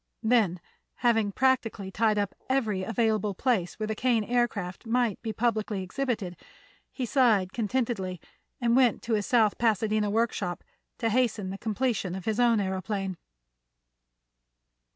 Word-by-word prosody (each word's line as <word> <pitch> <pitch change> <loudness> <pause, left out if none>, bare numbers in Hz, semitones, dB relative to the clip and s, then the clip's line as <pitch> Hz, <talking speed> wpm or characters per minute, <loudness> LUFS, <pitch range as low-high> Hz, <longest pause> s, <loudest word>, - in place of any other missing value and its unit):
Then 220 -6 +3 0.5
having 225 -4 +3
practically 230 -5 0
tied 215 +1 +2
up 205 -1 -1 0.2
every 220 -8 +1
available 215 -1 0
place 210 -7 0
where 215 - -2
the 220 - -2
Kane 235 0 +1
Aircraft 225 -4 -1
might 235 -2 +1
be 225 - -3
publicly 215 -3 -1
exhibited, 210 -4 -3 0.5
he 260 - -3
sighed 220 -6 +3
contentedly 220 -5 -1 0.4
and 235 -2 +2
went 255 -2 +3
to 230 - -1
his 210 -2 0
South 225 -4 +3
Pasadena 215 -2 +1
workshop 215 -5 -1 0.3
to 230 - 0
hasten 220 -5 +1
the 195 - -5
completion 220 -4 -1
of 190 - -7
his 220 +1 -1
own 240 -2 +4
aëroplane. 190 -1 -2
220 Hz, 135 wpm, -28 LUFS, 195-240 Hz, 0.5 s, own